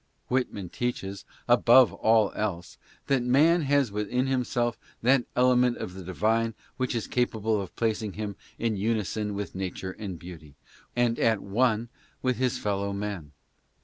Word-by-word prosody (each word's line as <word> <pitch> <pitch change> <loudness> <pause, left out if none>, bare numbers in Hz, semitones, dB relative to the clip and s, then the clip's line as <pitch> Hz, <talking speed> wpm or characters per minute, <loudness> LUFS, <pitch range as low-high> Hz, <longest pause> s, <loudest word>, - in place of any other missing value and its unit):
Whitman 125 -7 -1
teaches, 100 -5 -4 0.2
above 120 0 +6
all 110 -2 +3
else, 90 -5 -4 0.3
that 135 -2 +2
man 150 +8 +4
has 140 -5 +2
within 105 +5 -1
himself 125 -3 0 0.3
that 130 +1 +4
element 125 -1 +4
of 90 - -5
the 95 - -8
divine 110 +5 0 0.2
which 130 -2 -1
is 115 - -1
capable 110 -3 0
of 95 - -8
placing 110 -3 -1
him 105 -1 -4 0.2
in 115 -2 0
unison 105 0 -1
with 100 0 -4
nature 95 0 -4
and 95 -2 -6
beauty, 80 -4 -11 0.4
and 120 -1 +1
at 110 -3 +2
one 115 +2 +1 0.3
with 125 -2 +1
his 125 -1 0
fellow 100 -1 -1
men. 100 -7 -5
110 Hz, 145 wpm, -27 LUFS, 100-125 Hz, 0.4 s, above